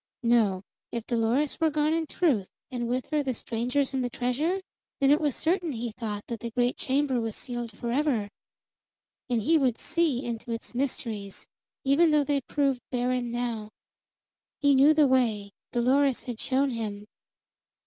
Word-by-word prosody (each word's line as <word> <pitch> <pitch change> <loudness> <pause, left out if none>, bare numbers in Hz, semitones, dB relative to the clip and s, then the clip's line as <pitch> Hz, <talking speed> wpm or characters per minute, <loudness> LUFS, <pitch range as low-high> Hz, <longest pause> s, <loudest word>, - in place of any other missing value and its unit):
No, 220 -5 +3 0.3
if 235 -1 -4
Dolores 240 +5 +1
were 325 -1 +3
gone 305 +1 +1
in 325 -1 0
truth, 260 - +1 0.2
and 240 -2 -2
with 250 +2 -2
her 305 -1 +2
the 265 -3 -2
strangers 250 +5 -1
and 260 -1 0
the 245 - -1
treasure, 270 +11 0 0.4
then 275 -1 +4
it 295 - +4
was 290 -4 +1
certain, 340 -2 0
he 235 0 -3
thought, 210 -2 -5
that 235 -2 -5
the 235 - -4
great 245 +1 +1
chamber 265 -2 0
was 225 -2 -3
sealed 240 -2 -5
forever. 240 0 0 1.0
And 235 -3 +1
he 320 +6 +4
would 255 -5 +1
see 320 -7 0
into 235 0 -5
its 230 +1 -5
mysteries, 225 -6 -3 0.4
even 285 +5 +4
though 300 -1 +4
they 285 -1 0
proved 275 -2 0
barren 250 0 0
now. 235 -3 -3 0.9
He 285 -1 +4
knew 280 +3 +6
the 305 -1 +6
way; 225 -6 +1 0.2
Dolores 260 +2 +2
had 240 -3 -6
shown 270 +1 +1
him. 210 -3 -4
250 Hz, 165 wpm, -27 LUFS, 230-285 Hz, 1.0 s, knew